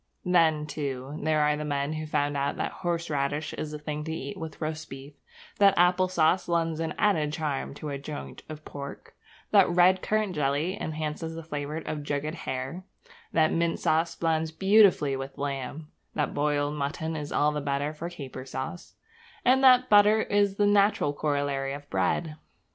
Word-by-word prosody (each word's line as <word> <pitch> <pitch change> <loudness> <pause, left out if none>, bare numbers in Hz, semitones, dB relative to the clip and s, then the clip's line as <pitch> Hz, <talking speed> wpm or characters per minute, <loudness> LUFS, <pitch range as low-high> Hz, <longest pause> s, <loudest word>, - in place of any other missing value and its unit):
Then, 165 -4 +3
too, 145 -1 -5
there 155 0 +2
are 150 0 +3
the 150 - -4
men 145 0 -1
who 155 0 -4
found 145 -1 0
out 140 0 -1
that - - -2
horseradish 155 -4 -2
is 155 - -4
the 150 - -6
thing 150 0 -5
to 160 - -4
eat 160 +5 -5
with 160 -4 -7
roast 155 0 -4
beef; 135 +2 -10 0.5
that 200 -1 +5
apple 180 +1 +4
sauce 180 0 +2
lends 165 -2 0
an 165 -1 -2
added 160 -9 +2
charm 145 -3 -3
to 150 - -6
a 140 -1 -4
joint 70 - -7
of 155 0 -9
pork; 140 -1 -8 0.4
that - - +6
red 180 +2 +4
currant 215 -3 0
jelly 150 +4 0
enhances 155 +1 -4
the 165 - -7
flavour 150 -1 -4
of 155 -2 -4
jugged 145 +1 -2
hare; 135 +2 -5 0.5
that 155 -1 +3
mint 170 0 0
sauce 160 +2 +1
blends 160 -1 0
beautifully 190 -6 +4
with 135 +1 -6
lamb; 140 +2 -4 0.2
that 150 - -1
boiled 145 0 0
mutton 150 +3 -3
is 150 -1 -5
all 150 +1 +2
the 150 0 -3
better 140 +1 -1
for 165 +3 -6
caper 135 -6 -8
sauce; 130 +6 -6 0.5
and 265 +2 +4
that 255 -1 +7
butter 210 +1 +6
is 205 -1 +1
the 205 - +2
natural 200 -7 +3
corollary 140 -2 -1
of 145 0 -8
bread. 150 - 0
155 Hz, 175 wpm, -27 LUFS, 145-170 Hz, 0.5 s, that